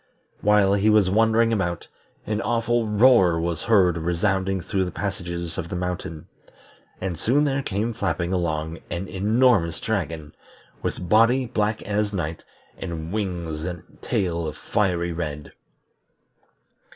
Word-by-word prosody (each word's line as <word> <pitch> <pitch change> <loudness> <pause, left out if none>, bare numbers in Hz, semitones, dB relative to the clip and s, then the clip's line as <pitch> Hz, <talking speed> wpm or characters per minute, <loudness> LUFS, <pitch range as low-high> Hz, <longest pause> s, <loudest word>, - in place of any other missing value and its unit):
While 105 -1 +4
he 100 +2 +3
was 105 -4 +4
wandering 115 +2 +3
about, 85 -5 -2 0.4
an 105 0 -1
awful 120 -1 0
roar 105 -6 +5
was 85 -1 -2
heard 95 -7 +3
resounding 95 +3 0
through 95 +2 -1
the - - -3
passages 85 -3 -4
of 85 -2 -5
the - - -4
mountain, 90 -3 -4 0.7
and 90 -3 -3
soon 140 +6 +2
there 140 -1 +1
came 110 0 -2
flapping 95 -4 -1
along 80 -2 -2
an 90 +2 -4
enormous 105 -3 +2
dragon, 80 -9 -3 0.5
with 90 - -3
body 115 +6 +4
black 110 -2 -1
as 105 +1 -1
night, 85 -4 -3 0.4
and 85 -2 -5
wings 85 -7 -3
and 90 -1 -7
tail 85 -3 -1
of 75 - -6
fiery 85 -4 0
red. 75 -3 -5
95 Hz, 135 wpm, -24 LUFS, 85-110 Hz, 0.7 s, roar